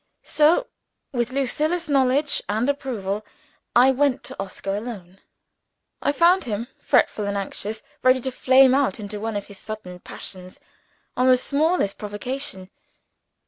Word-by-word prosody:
So, 315 +11 +3 0.5
with 240 -1 -1
Lucilla's 305 +6 0
knowledge 280 +1 +2
and 220 +4 0
approval, 220 -8 -2 0.5
I 250 +2 +7
went 270 0 +1
to - - -7
Oscar 195 0 -4
alone. 200 -4 -7 0.8
I - - +2
found 345 +4 +4
him 230 +1 -3
fretful 210 - +2
and 200 0 -1
anxious 210 +2 -4 0.2
ready 255 0 +5
to 260 - -2
flame 260 +1 +5
out 275 -2 +1
into 210 0 -6
one 225 0 -3
of 205 - -3
his 200 -2 -11
sudden 210 -5 -8
passions, 185 0 -9 0.6
on 255 - +2
the 255 -1 +6
smallest 290 - 0
provocation. 205 -2 -4
245 Hz, 140 wpm, -23 LUFS, 205-275 Hz, 0.8 s, I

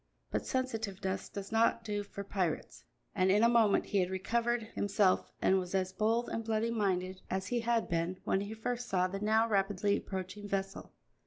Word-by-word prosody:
But - - -2
sensitiveness 215 -7 -2
does 200 0 -7
not 230 +1 +3
do 205 -2 -2
for 200 0 -7
pirates, 185 -5 -2 0.3
and 185 -2 +2
in 205 +3 +4
a - - +7
moment 230 -4 +4
he 200 - +1
had 180 -1 +1
recovered 235 +5 0
himself 205 -2 +2
and 190 - +4
was 180 +1 -4
as 190 0 0
bold 225 +4 +1
and 225 - -3
bloody 225 +1 0
minded 185 -4 -1
as 190 0 -1
he 240 +4 0
had 235 0 +1
been 170 +2 -1
when 190 - +1
he 205 +2 -5
first 245 +2 -3
saw 185 -1 +2
the 195 +2 -5
now 220 +2 +3
rapidly 200 -1 +1
approaching 190 +2 -6
vessel. 195 0 -3
200 Hz, 185 wpm, -32 LUFS, 190-225 Hz, 0.3 s, a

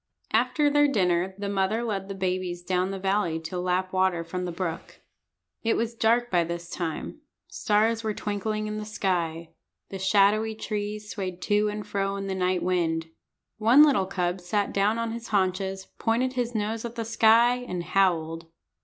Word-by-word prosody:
After 300 -1 +3
their 290 0 +4
dinner 185 -6 +1
the 200 0 -4
mother 200 +3 0
led 200 -4 -3
the 195 - -4
babies 185 -2 -2
down 185 +1 0
the 195 - -4
valley 190 -4 0
to 165 +3 -5
lap 185 +1 -1
water 185 -2 +2
from 180 +2 -4
the 175 - -3
brook. 170 -1 -5 0.6
It 225 - +1
was 230 0 -1
dark 235 +2 +2
by 175 -2 +3
this 170 +1 -6
time. 170 - -4 0.3
Stars 220 +2 +1
were 215 -1 -2
twinkling 215 +1 -2
in 215 0 -4
the 215 - -4
sky. 170 -6 -2 0.4
The 195 - -6
shadowy 210 +3 +3
trees 210 -1 -4
swayed 185 -3 -4
to 210 0 +2
and 210 0 -5
fro 195 -1 -1
in 195 0 -4
the 195 - -2
night 185 -1 0
wind. 165 -3 0 0.5
One 235 +7 +7
little 270 -11 +3
cub 180 -1 -2
sat 200 +3 -1
down 205 +3 +2
on 230 0 -2
his 235 0 -6
haunches, 190 -1 -1
pointed 245 +3 +1
his 245 -2 -2
nose 220 +1 -2
at 235 0 -6
the 230 -1 -3
sky, 230 +2 +5
and 180 -9 -5
howled. 165 -3 +1
195 Hz, 180 wpm, -26 LUFS, 180-220 Hz, 0.6 s, One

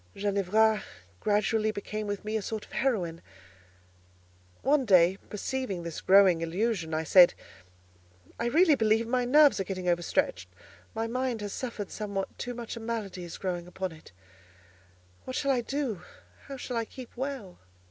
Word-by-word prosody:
Ginevra 205 +2 +2 0.4
gradually 215 +1 +1
became 215 0 -4
with 205 0 -4
me 215 +1 -2
a 220 - 0
sort 215 +1 -5
of - - -24
heroine. 180 -11 -1 1.4
One 285 0 +3
day, 185 -3 +5
perceiving 210 -4 -3
this 170 -2 -6
growing 190 -3 +6
illusion, 175 0 -1
I 160 - 0
said, 175 +2 +7 1.0
"I 235 - 0
really 320 +6 +5
believe 225 -3 +2
my 250 +1 0
nerves 290 +1 +6
are - - +1
getting 185 -1 -5
overstretched: 175 - 0 0.5
my 225 +1 -1
mind 250 -1 -2
has 205 -1 -4
suffered 230 -6 -5
somewhat 200 -2 -4
too 245 0 -4
much 235 -1 -6
a - - -6
malady 220 -5 -4
is 170 - -8
growing 175 -2 -3
upon 185 0 -4
it—what 90 - -16
shall 275 - +1
I 250 -2 +2
do? 255 -7 -3 0.5
How 275 -1 -7
shall 250 -2 -4
I 230 - -1
keep 255 +1 -11
well?" 255 -8 -5
210 Hz, 155 wpm, -29 LUFS, 175-240 Hz, 1.4 s, said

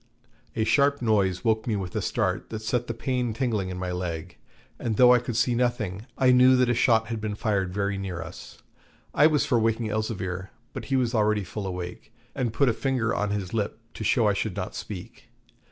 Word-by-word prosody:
A 110 - +1
sharp 140 +5 +3
noise 100 -6 +1
woke 110 0 +1
me 110 - +1
with 95 -3 -4
a - - 0
start - - -1
that 110 -1 -6
set 120 +2 -1
the 115 - -2
pain 120 -1 -1
tingling 110 -6 -1
in 90 - -5
my 90 0 -3
leg, 85 -3 -4 0.4
and 110 -3 -2
though 125 -1 +8
I 125 - +5
could 120 -1 -5
see 120 +2 +2
nothing, 120 -4 -1
I 130 -1 +5
knew 125 +1 +6
that 125 -1 +3
a - - +3
shot 115 -1 +3
had 115 -2 -3
been 105 -1 -3
fired 100 -5 -1
very 100 +1 -1
near 95 -3 -4
us. 85 +1 -9 0.6
I 150 - +6
was 150 -2 +2
for 120 -4 +2
waking 115 0 0
Elzevir, 95 -4 -3 0.2
but - - -6
he 135 - -1
was 125 -2 +1
already 105 -2 +2
full 100 +2 -5
awake, 90 -1 -6 0.2
and 125 -4 -1
put 140 +5 +2
a 120 - +3
finger 120 -1 0
on 105 0 -1
his 100 -2 -3
lip 105 -2 -1 0.2
to - - -6
show 110 +1 +3
I 105 - +3
should 100 -1 -2
not 90 -2 -4
speak. 110 +4 -8
110 Hz, 220 wpm, -26 LUFS, 100-120 Hz, 0.6 s, though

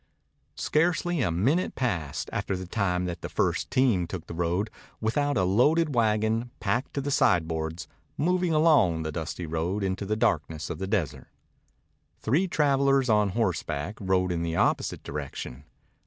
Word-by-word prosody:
Scarcely 175 +1 +1
a 105 - +1
minute 125 - +1
passed, 80 - -2
after 95 - -1
the 95 - -6
time 90 -2 0
that 90 -1 -4
the - - -5
first - - 0
team 115 -10 +2
took 90 -2 -6
the - - -8
road, 90 +5 -1 0.3
without 145 +6 0
a 95 - +3
loaded 145 - +3
wagon, 110 0 +1
packed 110 +4 -1
to 140 - 0
the 145 +1 -3
sideboards, 80 - +1 0.3
moving 180 +3 +1
along 150 - +4
the 80 - -3
dusty 85 +2 -4
road 85 +6 -2
into 95 +1 -2
the 105 - 0
darkness 80 -6 0
of 80 - -5
the 95 - -3
desert. 95 - -2 0.9
Three 155 +12 +1
travelers 140 -4 +2
on 105 -2 +4
horseback 90 -4 -1
rode 95 -1 +1
in 85 -1 -1
the 85 -1 -2
opposite - - 0
direction. 70 -2 -6
100 Hz, 155 wpm, -27 LUFS, 85-135 Hz, 0.9 s, along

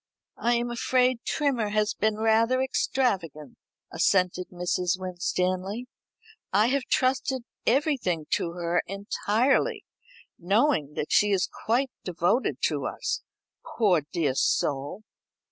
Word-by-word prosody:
"I 240 +1 +2
am 240 0 -1
afraid 250 +1 +2
Trimmer 265 -8 0
has 210 0 +1
been 215 0 0
rather 225 +3 +3
extravagant," 190 - -1 0.3
assented 185 -1 +1
Mrs. 180 0 -1
Winstanley. 185 +4 -2 0.7
"I 210 +4 +3
have 275 0 0
trusted 260 0 0 0.2
everything 245 - +1
to 170 - 0
her 175 0 0
entirely, 225 - 0 0.5
knowing 195 - +1
that 150 - -3
she 210 - +4
is 195 -2 +2 0.2
quite 250 +4 +2
devoted 180 +7 0
to - - 0
us, - - -3 0.6
poor 195 -8 +4
dear 160 -7 0
soul." 140 +8 0
210 Hz, 110 wpm, -26 LUFS, 180-250 Hz, 0.7 s, she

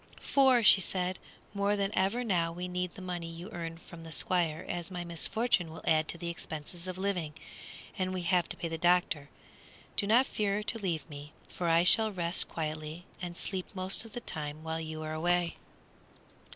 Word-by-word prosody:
"For," 260 -4 +4
said 185 -2 +4
she, - - -26 0.3
"more 200 +1 +2
than 200 -1 0
ever 200 +6 +1
now 175 -7 +1
we 180 +2 -5
need 180 0 -3
the 190 - -9
money 175 -2 -4
you 170 +5 -8
earn 165 -3 -5
from 170 0 -12
the 165 - -9
Squire, 170 -1 +1
as 175 0 -3
my 180 -2 -4
misfortune 175 +2 +1
will 160 - -10
add 155 0 +3
to - - +1
the 170 - -5
expenses 170 +1 -5
of 185 0 -5
living, 180 -6 -2 0.6
and 185 0 0
we 185 -1 -3
have 175 -1 +2
the 165 -2 -4
doctor 175 -1 +3
to 140 - -15
pay. - - -27 0.7
Do 200 - 0
not 240 +5 +5
fear 210 -3 -1
to 225 +2 0
leave 175 -6 -2
me, 145 -1 -10 0.2
for 175 -2 -2
I 165 +1 +5
shall 220 +4 +7
rest 175 -3 +2
quietly 155 +1 -4 0.2
and 175 -1 -5
sleep 190 -2 -3
most 185 +2 +2
of 225 -2 -12
the 240 - -5
time 150 -5 -4
while 160 0 -2
you 155 0 -5
are 155 0 -4
away." 175 +1 +1
175 Hz, 195 wpm, -31 LUFS, 165-190 Hz, 0.7 s, shall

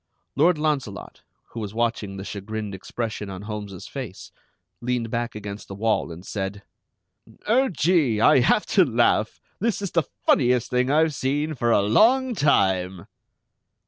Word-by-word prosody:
Lord 175 -1 +4
Launcelot, 145 -10 -3 0.3
who - - -7
was 105 -1 -6
watching 115 -4 -1
the 95 - -6
chagrined 105 +1 -5
expression 105 +2 -5
on 95 0 -7
Holmes's 105 -3 -7
face, 125 -9 -8 0.5
leaned 120 -2 -2
back 120 -1 -2
against 105 -1 -7
the 100 - -8
wall 110 -3 0
and 85 +3 -10
said: 100 0 -4 0.8
"Oh, 255 +5 +3
Gee! 150 - +2
I 115 - +6
have 130 - +3
to 190 - +6
laugh! 120 -5 +1 0.2
This 225 +1 0
is 200 -4 -4
the 165 - +3 0.2
funniest 125 -2 +3
thing 125 +1 +1
I've 155 +2 +3
seen 145 +4 -1
for 120 -4 -1
a 100 - +4
long 245 - +4
time!" 95 - +1
115 Hz, 150 wpm, -24 LUFS, 100-150 Hz, 0.8 s, I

